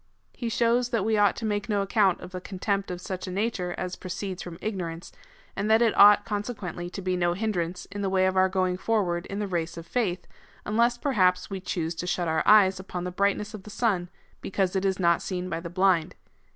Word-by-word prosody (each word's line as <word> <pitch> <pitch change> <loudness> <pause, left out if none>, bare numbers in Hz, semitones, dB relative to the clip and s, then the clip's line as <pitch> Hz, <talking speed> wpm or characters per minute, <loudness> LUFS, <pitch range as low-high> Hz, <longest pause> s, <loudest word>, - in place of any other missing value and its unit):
He 235 - -4
shows 235 +2 +2
that 230 -5 0
we 220 0 +2
ought 205 -1 +4
to 225 - -5
make 210 +2 -2
no 205 -2 +1
account 195 -2 +2
of 180 +1 -10
a 185 - -5
contempt 195 +1 -2
of 180 -1 -4
such 185 +1 -5
a - - -4
nature 190 -3 -2
as 185 0 -4
proceeds 185 0 -5
from 170 -2 -8
ig 215 -1 -3
norance, 170 -2 -6 0.4
and 200 +2 -2
that 220 +2 +5
it 225 - +2
ought, 205 0 +7
consequently, 205 -5 -4
to 195 +1 -7
be 185 0 0
no 175 -1 +1
hindrance 180 -3 -2
in 205 +1 -5
the 195 - 0
way 190 0 +2
of 190 0 +1
our 190 0 +4
going 185 -1 0
forward 185 -5 0
in 195 - -5
the 210 - -1
race 170 -4 -3
of 165 - -7
faith, 185 -2 -1 0.4
unless 235 +3 +2
perhaps 190 -10 +1
we 195 - -3
choose 170 -3 -3
to 170 +2 -5
shut 175 -1 -1
our 160 0 +1
eyes 195 -3 +6
upon 185 -2 -5
the 180 - -3
brightness 200 +3 0
of 215 - -7
the 210 - -12
sun, 200 -5 0 0.3
because 190 -1 -1
it 190 0 0
is 190 0 +1
not 170 -2 +3
seen 185 -1 -4
by 165 - -1
the 170 0 -7
blind. 180 -1 +2
190 Hz, 230 wpm, -26 LUFS, 180-210 Hz, 0.4 s, ought